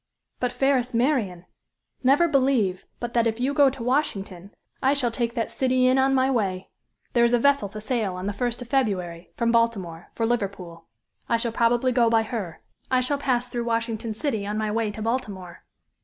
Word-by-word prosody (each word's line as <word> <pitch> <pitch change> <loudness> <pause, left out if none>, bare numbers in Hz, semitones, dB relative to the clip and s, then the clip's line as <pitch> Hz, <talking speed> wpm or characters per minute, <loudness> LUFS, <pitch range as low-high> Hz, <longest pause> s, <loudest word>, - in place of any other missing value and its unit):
"But 250 -1 0
fairest 260 -3 +1
Marian, 230 - 0 0.6
never 280 +6 +4
believe 260 - +1
but 240 0 -5
that 235 -1 +3
if 225 +1 -2
you 265 +3 0
go 285 -2 +5
to 260 -2 -7
Washington, 200 - -2 0.3
I 270 +2 +3
shall 250 -4 0
take 235 0 -2
that 230 -2 -2
city 255 -1 +1
in 255 +1 +4
on 270 0 +3
my 260 +1 +2
way. 195 -6 -1 0.4
There 235 - +4
is 235 0 +3
a - - +6
vessel 280 -4 +2
to 215 +2 -8
sail 215 -4 -1
on 185 +1 -5
the 205 - -2
first 240 +3 -2
of - - -15
February, 185 -10 -1
from 235 -1 +1
Baltimore, 200 -8 0
for 230 - 0
Liverpool. 195 -8 -3 0.4
I 230 - +3
shall 230 0 -2
probably 240 +2 +2
go 240 -2 +3
by 225 -1 +3
her. 215 -7 -6 0.3
I 255 - +3
shall 280 +3 0
pass 250 -3 0
through 240 -1 -4
Washington 230 -1 -2
City 220 -5 -2
on 210 +1 -3
my 215 -1 -1
way 225 0 0
to 210 +1 -6
Baltimore. 205 -7 -4
235 Hz, 200 wpm, -25 LUFS, 205-255 Hz, 0.6 s, a